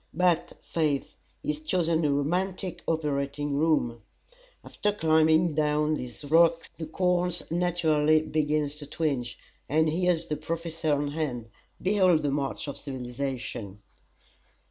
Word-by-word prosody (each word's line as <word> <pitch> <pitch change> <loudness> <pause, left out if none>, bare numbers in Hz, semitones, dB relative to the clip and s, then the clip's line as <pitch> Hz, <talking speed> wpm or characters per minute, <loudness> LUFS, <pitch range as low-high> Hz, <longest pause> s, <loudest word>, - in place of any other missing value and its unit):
But, 175 -1 +2
faith, 150 -4 -1 0.3
he's 150 0 -2
chosen 165 0 +1
a 150 - +2
romantic 180 +6 -1
operating 145 -2 -1
room. 140 -6 +1 0.6
After 210 - -1
climbing 160 -2 +3
down 150 0 +1
these 125 -2 -5
rocks 165 +2 +4
the 160 - -6
corns 180 +1 0
naturally 160 -3 +2
begin 150 -1 0
to 145 0 -6
twinge, 140 -6 -2 0.3
and 160 +2 +3
here's 170 +1 +1
the 150 -2 -3
Professor 165 -1 -3
on 145 0 -1
hand. 130 -7 -3 0.3
Behold 185 -5 +3
the 145 - +1
march 140 +1 -2
of 140 - -5
civilization!" 125 -6 -5
155 Hz, 120 wpm, -27 LUFS, 145-165 Hz, 0.6 s, rocks